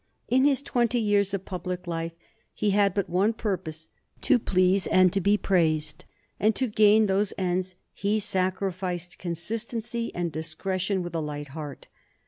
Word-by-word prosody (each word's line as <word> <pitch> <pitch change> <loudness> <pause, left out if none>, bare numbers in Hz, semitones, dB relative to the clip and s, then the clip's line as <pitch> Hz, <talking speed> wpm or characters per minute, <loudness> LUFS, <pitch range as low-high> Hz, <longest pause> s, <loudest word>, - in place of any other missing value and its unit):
In 260 +2 +3
his 280 -1 +3
twenty 240 -3 +1
years 205 -2 +2
of 195 -1 -3
public 180 -1 -5
life 165 -1 -3 0.4
he 210 -1 +1
had 200 -1 +3
but 200 -3 0
one 195 +6 +2
purpose 175 -8 -4 0.3
to 260 - +4
please 185 -1 +2
and 185 -1 +4
to 195 - +1
be 205 +3 +3
praised; 155 -6 0 0.3
and 215 +1 +3
to 260 - +1
gain 215 -1 +5
those 200 +1 +1
ends 185 0 -1 0.2
he 205 +2 0
sacrificed 185 -2 -2
consistency 225 +6 -3
and 175 -1 -1
discretion 185 +4 -2
with 175 -1 -6
a 165 - -1
light 145 -1 -5
heart. 145 0 -8
190 Hz, 155 wpm, -26 LUFS, 175-210 Hz, 0.4 s, gain